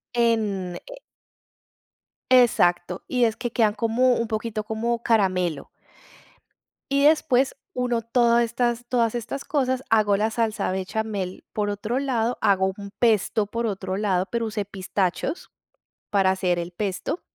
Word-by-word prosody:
En 210 -6 +1
Eh - - -10 1.3
Exacto, 180 -9 +3
y 250 -2 +2
es 220 -1 0
que 240 - -4
quedan 220 -3 +2
como 230 +4 +2
un 230 - -1
poquito 220 0 -3
como 230 +2 -2
caramelo. 185 -8 +1 1.2
Y 280 +1 +3
después 280 -4 +3 0.2
uno 245 -2 0
todo 235 +1 +3
estas 240 0 0
todas 235 -2 +1
estas 240 +4 -5
cosas, 260 -3 0
hago 210 -3 +3
la 215 +2 +1
salsa 220 -3 -1
bechamel 190 0 -3
por 210 -1 -1
otro 210 +5 -2
lado, 245 -3 0
hago 190 -2 +3
un 200 -1 -8
pesto 215 -2 +2
por 230 +3 -3
otro 190 -3 -3
lado, 190 -3 +1
pero 235 -1 -1
usé 210 -2 -3
pistachos 195 - -3 0.6
para 195 -2 +3
hacer 185 -2 0
el 170 +1 -5
pesto. 195 - -3
220 Hz, 140 wpm, -24 LUFS, 195-240 Hz, 1.3 s, Exacto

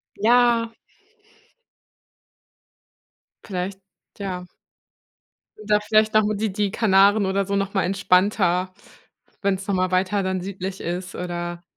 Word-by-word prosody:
Ja. 235 +1 +3 2.7
Vielleicht, 190 0 -4 0.4
ja. 185 -2 -4 1.1
Oder 210 0 +1
vielleicht 215 +1 +2
noch, 215 0 +5
hm, 210 0 -1
die 215 0 -1
die 200 0 -1
Kanaren 200 -1 +4
oder 195 +1 0
so 200 +1 -2
noch 195 0 -1
mal 195 - +1
entspannter, 185 0 +1 0.7
wenn 200 -1 +1
es 195 +1 -9
noch 200 - 0
mal 185 0 0
weiter 190 +2 +1
dann 185 -1 -2
südlich 190 0 -6
ist 180 +1 -5
oder 175 -1 -5
195 Hz, 120 wpm, -23 LUFS, 185-210 Hz, 2.7 s, noch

